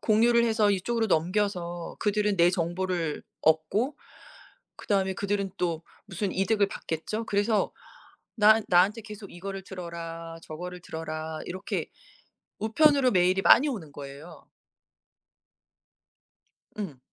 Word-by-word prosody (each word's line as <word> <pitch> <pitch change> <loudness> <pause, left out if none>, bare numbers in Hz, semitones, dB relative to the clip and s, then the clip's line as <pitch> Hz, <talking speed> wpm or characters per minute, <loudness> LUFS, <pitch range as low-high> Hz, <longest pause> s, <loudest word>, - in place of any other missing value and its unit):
공유를 235 +2 +4
해서 220 -3 +3
이쪽으로 225 +4 0
넘겨서 175 -1 -1
그들은 210 -1 +1
내 170 +1 +5
정보를 175 -2 -2 0.2
얻고 195 - +2 0.8
그 - - -12
다음에 190 -2 +2
그들은 200 -1 -1
또 170 -2 -1 0.2
무슨 190 +1 -3
이득을 200 +1 +2
받겠죠? 195 +7 -4
그래서 205 +1 +1 0.6
나 220 0 +6
나한테 190 +5 +4
계속 210 -2 -10
이거를 195 +2 -6
들어라, 165 -2 -7
저거를 180 +3 -7
들어라. 160 -1 -5
이렇게 185 +2 -4 0.7
우편으로 265 +4 +4
메일이 185 0 +3
많이 270 +8 +7
오는 200 - -4
거예요. 140 +4 -10 2.3
응. 185 -11 -5
190 Hz, 265 characters per minute, -27 LUFS, 170-210 Hz, 2.3 s, 많이